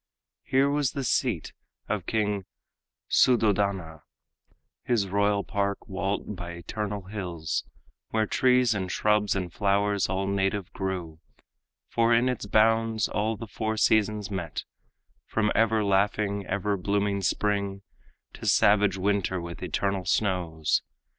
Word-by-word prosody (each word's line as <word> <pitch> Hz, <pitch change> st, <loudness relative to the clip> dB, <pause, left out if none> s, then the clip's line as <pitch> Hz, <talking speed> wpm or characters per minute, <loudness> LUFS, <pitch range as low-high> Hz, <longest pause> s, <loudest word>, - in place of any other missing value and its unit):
Here 135 Hz, +1 st, +2 dB
was 140 Hz, -3 st, 0 dB
the 140 Hz, -, -3 dB
seat -, -, 0 dB, 0.3 s
of -, -, -2 dB
King 105 Hz, -3 st, 0 dB, 0.6 s
Suddhodana, 100 Hz, -9 st, +2 dB, 0.8 s
His 110 Hz, -5 st, +1 dB
royal 100 Hz, +1 st, +1 dB
park, 100 Hz, -1 st, -2 dB
walled 100 Hz, +1 st, -3 dB
by 85 Hz, -1 st, -7 dB
eternal 100 Hz, +4 st, -4 dB
hills, 90 Hz, -5 st, -4 dB, 0.4 s
Where 110 Hz, -1 st, +1 dB
trees 125 Hz, +1 st, +3 dB
and 95 Hz, -3 st, -3 dB
shrubs 105 Hz, -1 st, +2 dB
and 90 Hz, -3 st, -3 dB
flowers 100 Hz, -1 st, +1 dB
all 95 Hz, +1 st, -1 dB
native 95 Hz, 0 st, -1 dB
grew; 90 Hz, -5 st, -4 dB, 0.7 s
For 115 Hz, 0 st, +3 dB
in 120 Hz, +2 st, +3 dB
its 125 Hz, -5 st, -3 dB
bounds 110 Hz, +1 st, +3 dB
all 110 Hz, +1 st, -1 dB
the 115 Hz, -, -6 dB
four 110 Hz, +1 st, -3 dB
seasons 105 Hz, -1 st, +2 dB
met, 90 Hz, -5 st, -4 dB, 0.6 s
From 105 Hz, -1 st, +1 dB
ever 110 Hz, 0 st, +3 dB
laughing, 100 Hz, 0 st, +1 dB
ever 100 Hz, +1 st, -1 dB
blooming 100 Hz, +1 st, 0 dB
spring 100 Hz, 0 st, -1 dB, 0.5 s
To -, -, -7 dB
savage 100 Hz, -2 st, +4 dB
winter 95 Hz, -1 st, 0 dB
with 85 Hz, -1 st, -7 dB
eternal 100 Hz, -2 st, -1 dB
snows. 90 Hz, -6 st, +1 dB
100 Hz, 125 wpm, -27 LUFS, 95-110 Hz, 0.8 s, savage